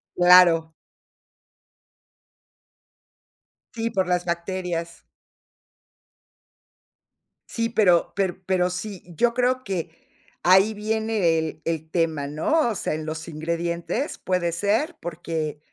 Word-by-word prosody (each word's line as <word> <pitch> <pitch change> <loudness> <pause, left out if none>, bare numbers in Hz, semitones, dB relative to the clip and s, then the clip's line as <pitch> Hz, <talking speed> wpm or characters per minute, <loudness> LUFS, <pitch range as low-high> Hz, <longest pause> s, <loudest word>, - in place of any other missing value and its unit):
Claro. 175 -2 +6 3.0
Sí, 230 -1 -2
por 190 -4 0
las 180 -1 0
bacterias. 170 -1 -4 2.4
Sí, 230 -1 -2
pero 190 -7 +3
pero 190 -2 -1
pero 180 -1 +1
sí, 190 +1 -6
yo 235 +8 +2
creo 250 +1 +1
que 180 -6 -3 0.5
ahí 190 +4 +5
viene 215 -5 0
el 160 -1 -5
el 160 -1 -3
tema, 160 -4 0
¿no?, 235 - +1
o 220 - -2
sea, - - -2
en 155 0 -4
los 160 +1 -5
ingredientes, 170 - -3
puede 180 -2 0
ser 205 - 0
porque, 160 -3 -4
180 Hz, 105 wpm, -24 LUFS, 165-210 Hz, 3.0 s, Claro